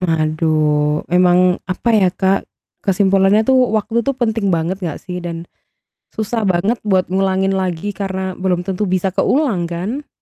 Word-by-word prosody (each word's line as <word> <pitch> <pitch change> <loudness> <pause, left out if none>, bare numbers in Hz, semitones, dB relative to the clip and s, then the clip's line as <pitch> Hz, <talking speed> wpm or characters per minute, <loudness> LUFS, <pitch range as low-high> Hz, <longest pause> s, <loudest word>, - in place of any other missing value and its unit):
Aduh. 155 -3 +1
Emang 180 0 +4
apa 185 +6 -2
ya 200 -4 +4
Kak? 190 +2 0 0.3
Kesimpulannya 195 +2 +3
tuh 260 +2 +3 0.2
waktu 220 +2 0
itu 275 +4 0
penting 225 -4 -1
banget 175 +1 -1
gak 170 -5 -4
sih? 180 -1 -5
Dan 170 -1 -6 0.7
susah 220 0 -2
banget 195 +6 +1
buat 185 -2 +1
ngulangin 190 0 +1
lagi 190 +1 -2
karena 190 -1 -4
belum 180 -1 0
tentu 195 +2 -2
bisa 185 +1 0
keulang 220 - +1
kan. 205 - -4
190 Hz, 145 wpm, -17 LUFS, 175-205 Hz, 0.7 s, Emang